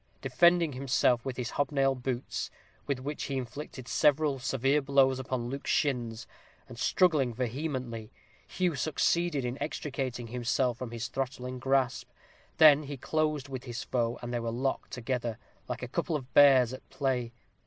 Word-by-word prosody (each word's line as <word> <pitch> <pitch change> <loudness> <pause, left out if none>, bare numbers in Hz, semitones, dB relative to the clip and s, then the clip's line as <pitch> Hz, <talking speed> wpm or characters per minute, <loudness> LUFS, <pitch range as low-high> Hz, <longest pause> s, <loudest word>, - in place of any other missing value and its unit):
Defending 170 -3 +4
himself 125 -2 +2
with 130 -2 -4
his 125 -2 -3
hobnail 135 -1 +1
boots, 130 -1 -3 0.4
with 140 - 0
which 145 +3 -4
he 135 - -2
inflicted 130 0 -6
several 150 -2 +2
severe 135 +3 +1
blows 135 -1 +3
upon 130 -2 -3
Luke's 140 +2 -5
shins, 120 -5 0 0.4
and - - -11
struggling 150 -10 +2
vehemently, 125 -3 -3 0.4
Hugh 180 -2 0
succeeded 155 +1 +1
in 125 +3 -4
extricating 135 -4 -3
himself 125 0 0
from 125 - -4
his 115 0 -4
throttling 130 -1 -4
grasp; 135 -1 0
he - - -37 0.4
then 145 -2 +6
closed 155 0 -1
with 130 -1 -6
his 120 -2 -5
foe, 120 -1 -1
and 120 0 -4
they 120 - 0
were 115 0 -3
locked 130 +4 -2
together, 120 -2 -3 0.3
like 125 0 -5
a - - -3
couple 170 +5 -2
of 130 -4 -6
bears 130 -4 +7
at 130 - -10
play. 125 -4 -1
130 Hz, 155 wpm, -30 LUFS, 125-145 Hz, 0.4 s, bears